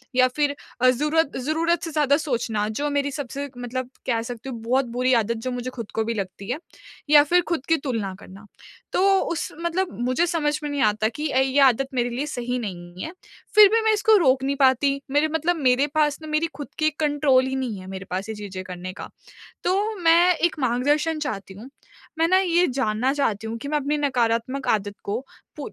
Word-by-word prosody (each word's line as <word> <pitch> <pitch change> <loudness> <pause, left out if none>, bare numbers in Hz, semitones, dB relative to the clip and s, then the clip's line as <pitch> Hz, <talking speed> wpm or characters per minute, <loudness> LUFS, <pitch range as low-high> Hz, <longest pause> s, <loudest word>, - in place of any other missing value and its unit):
या 255 0 +5
फिर 290 -1 +1 0.3
अ, 255 - +6
ज़ूरत 300 +4 +1
ज़रूरत 330 +2 +1
से 325 - -4
ज़्यादा 290 -2 +3
सोचना, 235 -8 -1
जो 285 +7 -2
मेरी 285 0 0
सबसे 280 0 -5
मतलब 245 +1 -4 0.2
कह 230 -3 +1
सकती 245 +2 -7
हूँ, 235 -3 -6
बहुत 255 +4 +1
बुरी 255 +1 +2
आदत 230 0 +1
जो 255 - -1
मुझे 250 0 -4
खुद 230 -4 -8
को 220 - +1
भी 230 - -1
लगती 195 0 -6
है, 255 - -1 0.5
या 295 -1 +8
फिर 355 +4 +3
खुद 315 -6 -1
की 325 - +4
तुलना 215 -7 -2
करना। 195 +2 -13 0.5
तो - - +2 0.2
उस 335 - -3
मतलब 345 +2 -1
मुझे 255 +7 +2
समझ 300 -3 0
में 295 - -3
नहीं 285 -1 -2
आता 215 0 +2
कि 300 +7 -4
अ, 260 - +2
ये 265 +1 +2
आदत 270 0 +4
मेरे 245 -1 0
लिए 255 +5 -2
सही 245 -3 -3
नहीं 175 -4 -7
है। 320 - -5 0.4
फिर 420 -1 +10
भी 455 - +4
मैं 440 - +4
इसको 430 +1 +4
रोक 265 -6 +3
नहीं 275 +1 0
पाती। 275 +1 +3
मेरे 290 +2 +3
मतलब 335 +3 +1
मेरे 265 -1 +3
पास 300 -1 +2
ना, 310 - -8
मेरी 305 +2 +1
खुद 290 -1 -7
की 310 - +2
एक 310 -1 -3
कंट्रोल 290 -3 +3
ही 265 - -2
नहीं 245 -7 -3
है 185 - -11
मेरे 190 0 -7
पास, 190 +4 -3
ये 220 - -4
चीज़ें 195 -3 -7
करने 185 0 -7
का। - - -9 0.6
तो 410 +4 0
मैं 345 +2 +5
एक 345 0 0
मार्गदर्शन 290 +6 +1
चाहती 195 -9 -5
हूँ, 230 +7 -11 0.5
मैं 330 +1 +3
ना, 375 +2 +5
ये 355 -1 +3
जानना 250 -1 0
चाहती 225 -7 -1
हूँ 225 +1 -4
कि 280 - -7
मैं 300 +1 +1
अपनी 295 +1 -1
नकारात्मक 255 -1 0
आदत 205 -1 0
को 210 +4 -2 0.4
पू 290 - -6
265 Hz, 215 wpm, -23 LUFS, 230-300 Hz, 0.6 s, फिर